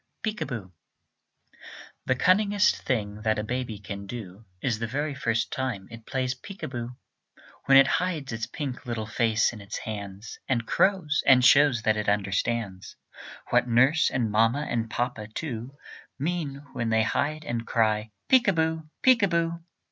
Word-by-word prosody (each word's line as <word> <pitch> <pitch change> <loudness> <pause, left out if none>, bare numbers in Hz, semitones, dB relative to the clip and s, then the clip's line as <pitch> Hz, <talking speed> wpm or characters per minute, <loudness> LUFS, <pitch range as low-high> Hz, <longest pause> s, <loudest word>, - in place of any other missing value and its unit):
PEEK 215 -1 -3
A - - 0
BOO 100 -8 -6 1.3
The 130 - +3
cunningest 200 +7 +3
thing 105 -5 -2
that 110 0 +1
a 105 - -1
baby 120 -1 -3
can 100 -1 -7
do 105 -2 -8
Is 115 +1 -1
the 115 - -2
very 145 +5 -2
first 120 -4 -1
time 120 -8 -3
it 115 -1 -11
plays 130 -2 -1
peek 195 +10 -11
a - - -1
boo; 120 -1 -6 0.7
When 135 0 +7
it 135 - +8 0.2
hides 160 -7 -3
its 110 -1 -3
pink 130 -1 -6
little 115 -2 -3
face 110 0 +1
in 110 - -9
its 100 - -6
hands, 100 -1 -7
And 120 -3 +1
crows, 175 - +2
and 125 -2 +7
shows 135 -3 +5
that 110 -1 +2
it 105 -1 0
understands 100 0 -1 0.6
What - - +3
nurse, 130 +7 +4
and 115 -4 -1
mamma 115 +7 +2
and 115 -1 -2
papa, 115 -2 -3
too, 120 +1 -6 0.4
Mean 145 -2 -3
when 115 -1 -2
they 110 0 +3
hide 150 +6 -1
and 115 -1 -3
cry, 110 -1 +1 0.2
"Peek 255 -3 +5
a 195 - +4
boo, 160 -1 -1
peek 255 -3 +6
a 200 - +4
boo." 170 -1 -1
120 Hz, 170 wpm, -26 LUFS, 110-145 Hz, 1.3 s, it